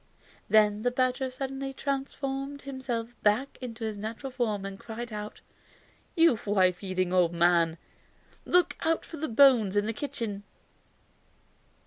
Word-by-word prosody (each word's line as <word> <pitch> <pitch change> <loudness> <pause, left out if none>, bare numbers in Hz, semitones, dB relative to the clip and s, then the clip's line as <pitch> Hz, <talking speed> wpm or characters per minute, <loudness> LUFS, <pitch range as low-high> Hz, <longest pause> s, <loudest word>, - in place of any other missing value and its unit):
Then 210 -1 +4
the 245 - +2
badger 255 +1 0
suddenly 270 +1 -5
transformed 275 0 -3
himself 245 -3 -4
back 215 +7 +1
to 230 -2 -6
his 215 -2 -3
natural 225 +6 -5
form 215 -6 -1
and 195 0 -7
cried 235 0 -7
out: 210 0 -6 0.7
"You 330 - +5
wife 185 -3 +2
eating 185 -1 -1
old 175 -2 +3
man! 170 -1 +3 0.7
Look 360 -1 +3
out 325 0 0
for 325 - -9
the 315 0 -3
bones 230 -5 +5
in 205 - +2
the 225 - -2
kitchen!" 220 -5 -4
230 Hz, 135 wpm, -28 LUFS, 205-270 Hz, 0.7 s, You